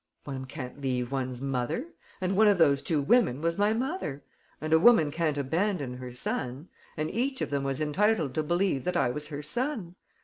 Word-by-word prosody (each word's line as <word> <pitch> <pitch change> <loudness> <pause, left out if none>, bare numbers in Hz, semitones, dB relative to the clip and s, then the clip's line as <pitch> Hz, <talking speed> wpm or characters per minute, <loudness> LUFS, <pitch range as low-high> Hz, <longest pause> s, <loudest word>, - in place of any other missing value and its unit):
"One 135 -2 -5
can't 130 0 -8
leave 125 -2 -1
one's 130 -1 -3
mother; 135 - -1 0.3
and 185 0 0
one 215 +2 +6
of 205 -2 +5
those 140 -5 +4
two 160 -3 0
women 200 - +3
was 170 +4 -1
my 205 +1 +4
mother. 235 - -2 0.4
And 155 +1 -1
a 160 - +7
woman 170 -7 +6
can't 155 -2 0
abandon 145 -2 -1
her 125 -1 -7
son; 125 +4 -4 0.3
and 155 0 -2
each 265 +3 -1
of - - -2
them 140 -1 0
was 135 0 -2
entitled 155 -1 +1
to 155 - 0
believe 175 -3 0
that 180 - 0
I 120 - +2
was 150 +3 -5
her 150 -1 -6
son. 230 - -2
155 Hz, 200 wpm, -28 LUFS, 135-195 Hz, 0.4 s, a